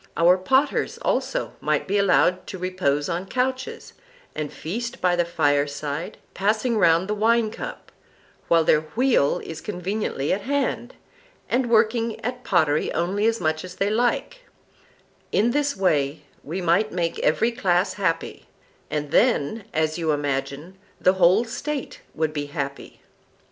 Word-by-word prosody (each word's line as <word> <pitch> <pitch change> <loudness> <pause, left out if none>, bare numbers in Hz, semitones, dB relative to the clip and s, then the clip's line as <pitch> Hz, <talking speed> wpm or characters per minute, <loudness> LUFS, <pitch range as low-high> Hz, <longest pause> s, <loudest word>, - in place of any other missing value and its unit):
Our 170 +2 +6
potters 265 - +1
also - - -1
might - - 0
be 200 +1 +1
allowed 185 -1 +3
to 190 - -6
repose 180 -6 -1
on 175 +3 -3
couches, 255 +3 -3 0.4
and 150 -1 -4
feast 235 +9 -5
by 180 -1 +2
the 175 -1 +1
fireside, 145 -1 -1 0.2
passing 215 +5 +1
round 170 0 +4
the 210 - -1
winecup, 225 +1 -1 0.6
while 165 -1 +4
their 155 -1 +4
wheel 220 - +2
is 160 - -7
conveniently 185 -6 -2
at 200 - -2
hand, 265 -1 -2 0.5
and 250 -1 0
working 230 0 +2
at 250 +1 -4
pottery 155 -5 +2
only 190 +6 0
as 230 0 +1
much 155 -2 -1
as 180 0 -9
they 200 +1 0
like; 245 - 0 0.9
in 230 +4 +2
this 285 -1 0
way 150 -6 +1 0.2
we 175 +6 -4
might 175 +5 +2
make 170 -1 -2
every 225 +10 +2
class 185 -5 +1
happy—and 165 -4 -4
then, 220 - +2
as 155 +1 0
you 160 -2 +1
imagine, 145 +5 -3 0.2
the 185 - +4
whole 190 +5 +4
State 285 +4 -5
would 155 -1 -1
be 145 -1 -3
happy. 140 -1 -6
185 Hz, 140 wpm, -24 LUFS, 155-230 Hz, 0.9 s, Our